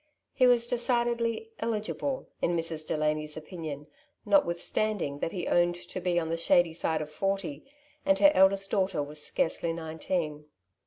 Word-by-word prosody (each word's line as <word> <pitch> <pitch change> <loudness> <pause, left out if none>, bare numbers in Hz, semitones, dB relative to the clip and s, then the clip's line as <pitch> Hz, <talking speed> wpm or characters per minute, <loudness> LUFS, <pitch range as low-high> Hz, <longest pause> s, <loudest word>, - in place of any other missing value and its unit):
He 255 - +4
was 240 -1 +5
decidedly 240 - 0
" - - -36
eligible 230 +5 -2
'^ - - -15
in 170 0 +2
Mrs. 165 -1 -3
Delany's 150 0 0
opinion, 155 -2 -7 0.4
notwithstanding 180 - +1
that 165 - -2
he 180 -3 -4
owned 175 0 +3
to 175 +1 -8
be 175 -1 0
on 160 -1 -3
the 165 - -1
shady 170 0 +3
side 160 -1 -1
of 150 - -11
forty, 195 -3 -2 0.4
and 290 0 +3
her 295 - +7
eldest 195 +1 +4
daughter 190 -7 +1
was 150 +1 -5
scarcely 165 0 0
nineteen. 160 -1 -3
175 Hz, 160 wpm, -29 LUFS, 155-215 Hz, 0.4 s, her